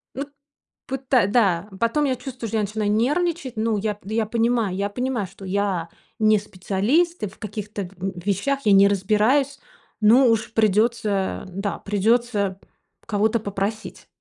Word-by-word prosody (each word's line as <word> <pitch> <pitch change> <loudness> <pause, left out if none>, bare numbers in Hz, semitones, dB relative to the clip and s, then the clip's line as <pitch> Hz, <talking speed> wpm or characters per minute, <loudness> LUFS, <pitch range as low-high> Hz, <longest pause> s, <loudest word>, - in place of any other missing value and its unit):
Вот 280 +3 -4 0.6
пыта 265 -5 +1
Да. 200 -4 +2
Потом 260 +6 +1
я 265 -2 +1
чувствую, 250 -2 -7
что 225 - -1
начинаю 210 0 -1
нервничать. 290 +5 0
Ну, 220 0 +1
я 210 +1 -1
пд 205 0 -12
я 220 0 +1
понимаю 230 -3 0
я 200 +1 -1
понимаю, 245 -2 -2
что 195 +2 -12
я 190 -3 -1 0.3
не 215 -1 +4
специалист 210 - 0
и - - 0
в 195 - -14
каких-то 210 -1 -5
в 180 -1 -5
вещах 205 +8 0
я 210 - +5
не 195 0 +7
разбираюсь, 215 +8 +2 0.4
но 240 +5 +6
уж 225 -1 +1
придется 215 -2 +1
Да, 195 +2 -4
придется 205 -1 0 0.5
кого-то 220 +2 +1
попросить. 205 +1 -4
215 Hz, 150 wpm, -23 LUFS, 200-240 Hz, 0.6 s, не